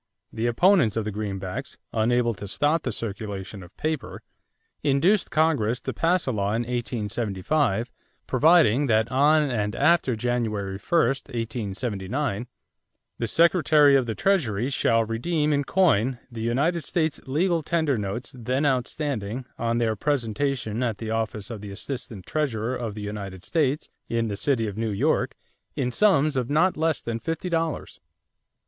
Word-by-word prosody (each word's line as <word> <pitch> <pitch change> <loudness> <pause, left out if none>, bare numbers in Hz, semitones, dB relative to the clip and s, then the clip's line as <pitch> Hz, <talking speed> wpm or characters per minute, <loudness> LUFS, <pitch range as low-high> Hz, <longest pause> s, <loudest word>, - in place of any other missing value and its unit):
The 115 +1 -1
opponents 140 - +4
of 110 - -1
the 105 - -2
greenbacks, 95 -3 -5 0.2
unable 120 +1 +2
to 100 - -8
stop 150 +10 +1
the 125 - -2
circulation 105 -2 -5
of 90 - -14
paper, 155 -2 -3 0.6
induced 170 +9 +2
Congress 145 -8 +2
to - - -4
pass 175 +2 +1
a 130 - 0
law 100 -2 -1
in 115 - 0
1875 120 0 -1 0.3
providing 145 -2 +4
that 110 -1 +2
on 150 +4 +4
and 105 -3 -1
after 170 -8 +3
January 110 -5 -2
1, 170 - +1
1879, 115 -1 -3 0.7
"the 115 - -1
Secretary 155 - +5
of 130 -3 +2
the 110 - -2
Treasury 135 - +1
shall 115 -3 +2
redeem 150 +7 0
in 145 0 +1
coin 135 - +2
the 115 -1 -6
United 140 +10 +1
States 160 +1 -1
legal 165 +5 +1
tender 160 -3 +1
notes 105 +3 -4
then 130 +4 -1
outstanding 130 -3 -1
on 115 0 0
their 115 -2 +1
presentation 120 -2 -1
at 115 -4 -1
the 110 -1 -5
office 110 0 -3
of 110 -3 -6
the 105 - -7
Assistant 110 -1 -5
Treasurer 130 -5 -1
of 115 -4 -4
the 105 - -6
United 100 -3 -6
States 150 -3 0 0.2
in 115 -1 0
the 100 - -2
City 115 +1 +1
of 105 -2 -4
New 115 -1 0
York 100 - 0 0.4
in 125 - -1
sums 155 - +3
of 125 -2 -1
not 165 +6 +3
less 160 -1 0
than 115 -1 -3
fifty 165 +8 -3
dollars." 165 -2 -2
120 Hz, 155 wpm, -25 LUFS, 110-150 Hz, 0.7 s, Secretary